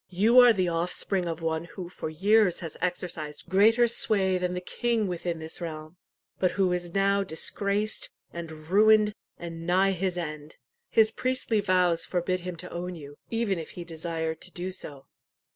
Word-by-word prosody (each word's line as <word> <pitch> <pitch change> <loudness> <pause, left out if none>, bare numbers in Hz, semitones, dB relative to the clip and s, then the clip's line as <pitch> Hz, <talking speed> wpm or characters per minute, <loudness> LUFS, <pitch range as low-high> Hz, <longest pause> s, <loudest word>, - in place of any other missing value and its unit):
You 215 +7 +5
are 245 -1 +9
the 185 -5 +1
offspring 175 +2 0
of 165 0 -4
one 160 0 -1
who 175 +1 -8
for 175 -3 -6
years 195 +4 +3
has 165 -3 -6
exercised 170 -4 -3
greater 225 +5 +5
sway 195 -5 +3
than 180 0 -1
the - - -2
king 230 +4 -1
within 175 -2 -3
this 160 +2 -7
realm, 155 0 -7 0.4
but 185 - +3
who 190 -2 +2
is 175 0 -4
now 200 0 +3
disgraced 200 +4 -1 0.2
and 170 -1 -6
ruined, 210 +7 +4 0.2
and 165 -1 -7
nigh 190 +2 +3
his 185 -1 -2
end. 155 -3 -6 0.3
His 220 -1 +4
priestly 255 -2 -1
vows 180 -3 +2
forbid 185 0 -1
him 180 0 -6
to 165 - -10
own 180 +1 -5
you, 145 -3 -10
even 225 -6 0
if 160 - -8
he 175 - -5
desired 160 -1 -4
to 180 - -4
do 180 +2 -4
so." 145 -7 -5
180 Hz, 175 wpm, -27 LUFS, 165-200 Hz, 0.4 s, are